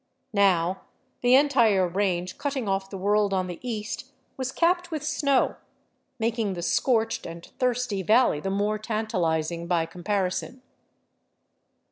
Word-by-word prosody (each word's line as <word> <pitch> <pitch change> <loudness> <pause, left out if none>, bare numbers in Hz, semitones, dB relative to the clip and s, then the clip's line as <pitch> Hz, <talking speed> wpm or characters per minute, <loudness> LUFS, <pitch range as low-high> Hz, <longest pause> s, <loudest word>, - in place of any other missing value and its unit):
Now 190 -3 +2 0.4
the 245 +1 +5
entire 235 -10 +4
range 185 -1 -1
cutting 275 -5 -2
off 195 0 -1
the 195 - -6
world 205 +1 +2
on 185 -1 0
the 175 -2 -7
east 230 -2 -5 0.2
was 260 -1 -3
capped 350 +3 +1
with 310 -3 -4
snow, 280 -3 +1 0.6
making 225 -3 -1
the 175 - -5
scorched 225 +1 +1
and 170 0 -9
thirsty 250 -5 0
valley 220 -4 +3
the 195 - -3
more 205 +2 0
tantalizing 170 -7 -1
by 170 -2 +1
comparison. 190 +8 -3
210 Hz, 130 wpm, -26 LUFS, 185-250 Hz, 0.6 s, the